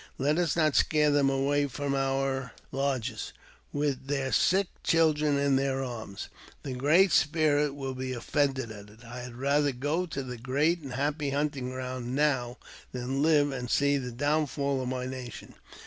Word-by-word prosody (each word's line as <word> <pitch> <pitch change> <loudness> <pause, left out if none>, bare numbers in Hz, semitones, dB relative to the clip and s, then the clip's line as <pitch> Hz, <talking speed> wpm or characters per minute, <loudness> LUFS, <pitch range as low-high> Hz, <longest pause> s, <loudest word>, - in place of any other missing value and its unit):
Let 150 +5 +1
us 170 -4 +1
not 155 -3 +2
scare 150 -1 +3
them 145 -1 +3
away 140 +1 +1
from 140 +1 -3
our 135 -1 -1 0.2
lodges, 130 -5 -2 0.4
with 145 -2 -1
their 135 -2 -1
sick 195 +2 +3 0.2
children 155 -3 +3
in 140 -1 +3
their 135 0 0
arms. 110 -6 -6 0.4
The 135 - -4
Great 155 +9 +4
Spirit 150 -1 +2
will 135 -2 -4
be 130 0 -4
offended 130 0 -1
at 105 -1 -10
it. 110 +3 -17
I 120 +2 -8
had 125 -1 -8
rather 140 +3 +2
go 145 +8 -1
to 140 -4 -4
the 125 -1 -6
great 145 +8 +1
and 135 -5 -8
happy 145 +2 -1
hunt 145 +1 0
ing 125 -2 -4
ground 130 -1 -4
now 130 -4 +1 0.3
than 130 +2 -2
live 150 -2 +4
and 125 -2 -5
see 140 +1 +3
the 125 -2 -5
downfall 140 0 0
of 130 - -3
my 125 0 -3
nation. 130 -2 -7
135 Hz, 175 wpm, -29 LUFS, 130-145 Hz, 0.4 s, Great